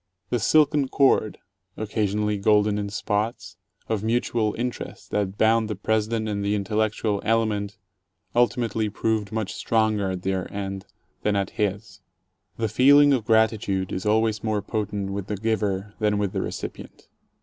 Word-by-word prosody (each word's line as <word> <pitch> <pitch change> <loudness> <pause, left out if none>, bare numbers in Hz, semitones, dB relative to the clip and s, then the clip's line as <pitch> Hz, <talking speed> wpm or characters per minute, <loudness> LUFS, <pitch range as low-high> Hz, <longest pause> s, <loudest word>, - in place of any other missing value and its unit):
The 120 - +1
silken 150 +3 +3
cord 130 -5 +2 0.4
(occasionally 105 -1 -1
golden 105 0 +3
in 100 0 -3
spots) 105 +2 -2 0.3
of 110 -3 -1
mutual 115 -1 0
interest 125 +1 -5
that 100 -1 -1
bound 110 0 +3
the 105 - -2
President 110 +2 0
and 100 -1 -2
the 100 +1 +1
intellectual 105 0 -1
element 110 -2 0 0.6
ultimately 115 -3 +1
proved 110 -1 -1
much 110 -3 -3
stronger 110 -3 +1
at 95 -1 -4
their 95 -1 -2
end 95 -1 -5 0.3
that 105 -1 +1
at 100 -1 -1
his. 100 -1 -3 0.6
The 115 - 0
feeling 140 +6 +6
of 120 -5 0
gratitude 110 -4 +2
is 95 - -3
always 110 0 +2
more 110 -3 -1
potent 105 -2 -3
with 100 -1 -4
the 105 - -3
giver 105 -2 -1
than 105 -1 +1
with 100 -2 -1
the - - -2
recipient. - - -7
105 Hz, 150 wpm, -24 LUFS, 100-110 Hz, 0.6 s, feeling